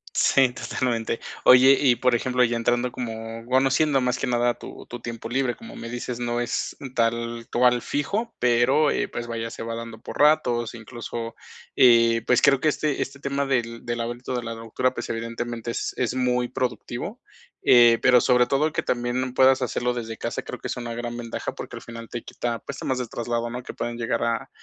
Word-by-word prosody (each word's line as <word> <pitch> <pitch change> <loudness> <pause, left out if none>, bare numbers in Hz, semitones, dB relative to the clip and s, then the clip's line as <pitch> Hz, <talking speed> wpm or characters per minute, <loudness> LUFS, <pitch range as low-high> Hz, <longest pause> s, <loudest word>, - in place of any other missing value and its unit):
Sí, 135 -2 +4
totalmente. 115 -3 -2 0.2
Oye, 130 +1 +8
y 130 -4 +4
por 125 +1 +2
ejemplo, 125 +1 +1
ya 120 0 +1
entrando 120 +1 +1
como, 115 -1 -6
bueno, 130 +2 +3
siendo 145 -1 +3
más 125 0 0
que - - -1
nada 120 0 +1
tu - - -10
tu 120 - -7
tiempo 115 -1 -6
libre, 130 -1 0
como 230 - -11
me 115 - -7
dices, 120 0 -5
no 120 0 -1
es 120 - -2 0.2
tal 115 0 -1
cual 125 0 +3
fijo, 210 +11 -2
pero, 125 +5 +3
eh, - - 0
pues, 120 - -6
vaya, 115 -1 -4
se - - -7
va 115 0 -4
dando 115 -1 -7
por - - -8
ratos, 120 -6 +3
incluso, 115 0 -6 0.4
eh, 115 -2 +5
pues, 125 - +4
creo 140 -1 +5
que 155 - +1
este 150 -1 0
este 140 +1 -5
tema 140 0 -1
del 115 -3 -2
del 120 0 -2
hábito 120 +2 -4
de 120 - -2
la 115 - -4
lectura, 115 +3 -1
pues, 120 - -5
evidentemente 115 +1 -4
es - - -3
es 125 -2 0
muy 125 -1 0
productivo. 125 -2 -4 0.4
Eh, 120 -2 +7
pero 125 -1 +6
sobre 125 -1 +4
todo 150 +4 +1
que - - 0
también 125 +1 -1
puedas 130 0 +5
hacerlo 125 0 -1
desde 115 -2 -5
casa, - - -3
creo - - -8
que - - -5
es - - -4
una 120 -1 -5
gran 120 0 -4
ventaja, 120 -1 -5
porque - - -8
al - - -9
final 115 -1 -9
te 120 - -5
quita, 120 -1 -3
pues, 140 - -8
temas 130 - -1
del 125 - -3
traslado, 120 0 -2
¿no? 125 +1 -5
Que - - -8
pueden 120 0 -4
llegar 115 0 -1
a 115 -1 -2
120 Hz, 205 wpm, -24 LUFS, 115-130 Hz, 0.4 s, Oye